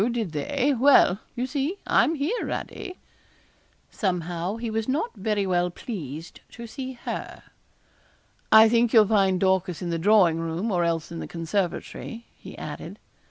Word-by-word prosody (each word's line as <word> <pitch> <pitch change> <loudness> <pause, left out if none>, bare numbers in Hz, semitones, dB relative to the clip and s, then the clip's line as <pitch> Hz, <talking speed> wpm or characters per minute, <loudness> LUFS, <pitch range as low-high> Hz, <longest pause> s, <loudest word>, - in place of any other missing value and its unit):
did 230 -7 -2
they? 265 - 0
Well, 255 -7 +5 0.2
you 245 0 -1
see, 285 +7 -2
I'm 325 - +3
here, 320 - -1
Radie.' 375 -3 -5 1.0
Somehow 180 -1 -2
he 230 0 -4
was 220 0 -2
not 310 - -1
very 205 0 -1
well 180 -1 +1
pleased 165 - -7
to 235 - -8
see 260 +3 -6
her. 240 - -6 1.1
'I 220 0 +9
think 235 0 +2
you'll 220 -3 +7
find 195 -3 +2
Dorcas 190 -2 +1
in 175 -2 -4
the 165 - -1
drawing 180 -3 +4
room, 165 +7 -2
or 175 -2 +1
else 165 -1 -1
in 165 - -6
the - - -5
conservatory,' 185 +6 -4
he - - -12
added. - - -7
205 Hz, 155 wpm, -25 LUFS, 175-240 Hz, 1.1 s, I